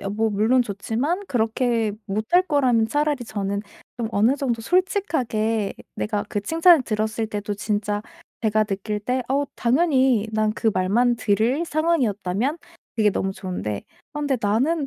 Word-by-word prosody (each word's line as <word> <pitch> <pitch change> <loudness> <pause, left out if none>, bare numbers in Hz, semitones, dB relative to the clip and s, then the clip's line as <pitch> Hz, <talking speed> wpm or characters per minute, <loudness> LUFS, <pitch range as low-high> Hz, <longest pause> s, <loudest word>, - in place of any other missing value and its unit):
예 - - -6
뭐 220 +2 0
물론 220 +5 +3
좋지만 240 - -2
그렇게 230 - 0 0.2
못할 215 - +2
거라면 255 -8 +3
차라리 290 +1 0
저는 200 -2 -3 0.4
좀 235 -2 -2
어느 225 +7 +3
정도 250 -5 -1
솔직하게 245 - 0 0.2
내가 210 -1 -1
그 205 - -2
칭찬을 325 - +5
들었을 220 0 -1
때도 210 -1 -4
진짜 205 0 -2 0.4
제가 215 0 +2
느낄 210 +1 -3
때 250 +5 -1
어 280 +2 +1
당연히 260 -4 +2
난 215 0 +1
그 220 0 +1
말만 235 +7 +2
들을 225 +8 +1
상황이었다면 270 - 0 0.4
그게 215 -2 +4
너무 195 0 -2
좋은데 180 - -4 0.3
아 295 - -4
근데 285 -2 +1
나는 270 +10 +1
225 Hz, 305 characters per minute, -23 LUFS, 210-275 Hz, 0.4 s, 칭찬을